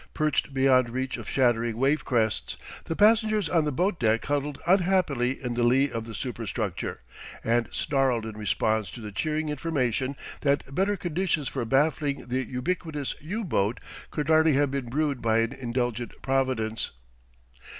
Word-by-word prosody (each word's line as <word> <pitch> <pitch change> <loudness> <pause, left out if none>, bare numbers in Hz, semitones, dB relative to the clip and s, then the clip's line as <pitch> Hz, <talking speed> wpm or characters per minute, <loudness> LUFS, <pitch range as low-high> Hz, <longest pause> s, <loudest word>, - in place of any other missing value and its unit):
Perched 155 -2 +1
beyond 130 -2 +4
reach 130 +2 -2
of - - -7
shattering 120 -3 +2
wavecrests, 125 -5 +1 0.3
the 165 - -3
passengers 215 -1 +4
on 160 -1 +2
the 150 - 0
boat 180 +6 0
deck 110 -1 +2
huddled 145 0 -1
unhappily 175 -9 +2
in 125 -1 -2
the 120 - -1
lee 130 +4 +3
of 115 -1 -4
the 115 -1 -7
superstructure 115 - -3 0.4
and 115 0 +1
snarled 130 -5 +1
in 110 -1 -6
response 110 0 0
to - - -9
the 105 -2 -7
cheering 155 +8 -1
information 140 -3 -1 0.2
that 140 -1 0
better 195 +5 +1
conditions 175 -4 -1
for 130 - -2
baffling 140 +1 +1
the 130 +1 0
ubiquitous 145 +2 -2
U 205 +10 -3
boat 110 - 0 0.3
could 150 -2 -3
hardly 160 -1 +5
have 140 0 +2
been 135 -3 -3
brewed 145 0 0
by 110 -1 +2
an 115 +2 +1
indulgent 120 -2 -2
Providence. 130 -5 0
135 Hz, 155 wpm, -27 LUFS, 120-155 Hz, 0.4 s, hardly